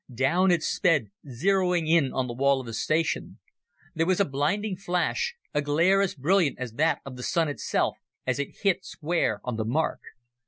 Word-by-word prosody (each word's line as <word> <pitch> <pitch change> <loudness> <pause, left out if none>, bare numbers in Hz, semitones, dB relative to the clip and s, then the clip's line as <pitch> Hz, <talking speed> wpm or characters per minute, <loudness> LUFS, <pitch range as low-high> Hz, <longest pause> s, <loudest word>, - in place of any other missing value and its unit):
Down 145 +10 +2
it 175 -3 +2
sped, 155 - +1 0.2
zeroing 180 +4 +1
in 160 -5 +3
on 130 - -1
the 120 - -5
wall 140 +2 +2
of 130 - -7
the 115 - -7
station. 155 +8 -1 0.6
There 165 +1 0
was 185 0 +2
a 200 - +4
blinding 185 +9 -1
flash, 185 - -1 0.2
a 145 - +1
glare 170 +7 +3
as 195 - 0
brilliant 165 +2 +2
as 125 -3 -5
that 160 +6 +1
of 130 -2 -8
the - - -7
Sun 165 +1 +1
itself, 145 - -1 0.3
as 130 0 -1
it 140 - -5
hit 190 -2 +2
square 155 -10 -1
on 125 -3 -3
the 110 - -2
mark. 150 +8 0
155 Hz, 190 wpm, -26 LUFS, 135-180 Hz, 0.6 s, a